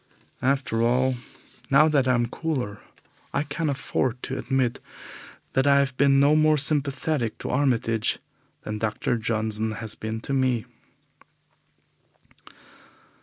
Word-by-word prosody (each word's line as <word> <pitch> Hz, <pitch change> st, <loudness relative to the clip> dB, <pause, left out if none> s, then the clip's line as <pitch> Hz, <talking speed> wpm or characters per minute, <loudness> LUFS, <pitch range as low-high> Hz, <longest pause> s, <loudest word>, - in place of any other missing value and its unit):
After 130 Hz, -4 st, 0 dB
all, 125 Hz, +3 st, +2 dB, 0.6 s
now 140 Hz, +3 st, +6 dB
that 140 Hz, -4 st, +2 dB
I 130 Hz, -, +4 dB
am 120 Hz, 0 st, +1 dB
cooler, 125 Hz, -6 st, -3 dB, 0.6 s
I -, -, +1 dB
can 155 Hz, +1 st, -2 dB
afford 130 Hz, -2 st, -2 dB
to 130 Hz, -, -4 dB
admit 130 Hz, -3 st, 0 dB, 0.7 s
that 130 Hz, +1 st, +2 dB
I 140 Hz, 0 st, +6 dB
have 135 Hz, -2 st, +1 dB
been 135 Hz, 0 st, +4 dB
no 145 Hz, +2 st, +5 dB
more 155 Hz, 0 st, +4 dB
sympathetic 140 Hz, -3 st, 0 dB
to -, -, -5 dB
Armitage 120 Hz, -5 st, +1 dB, 0.5 s
than 105 Hz, 0 st, -4 dB
Dr. 110 Hz, +2 st, -1 dB
Johnson 110 Hz, -1 st, -1 dB
has 110 Hz, -1 st, +1 dB
been 110 Hz, +1 st, -4 dB
to 140 Hz, -, -4 dB
me. 130 Hz, -4 st, +1 dB
130 Hz, 125 wpm, -25 LUFS, 115-140 Hz, 0.7 s, now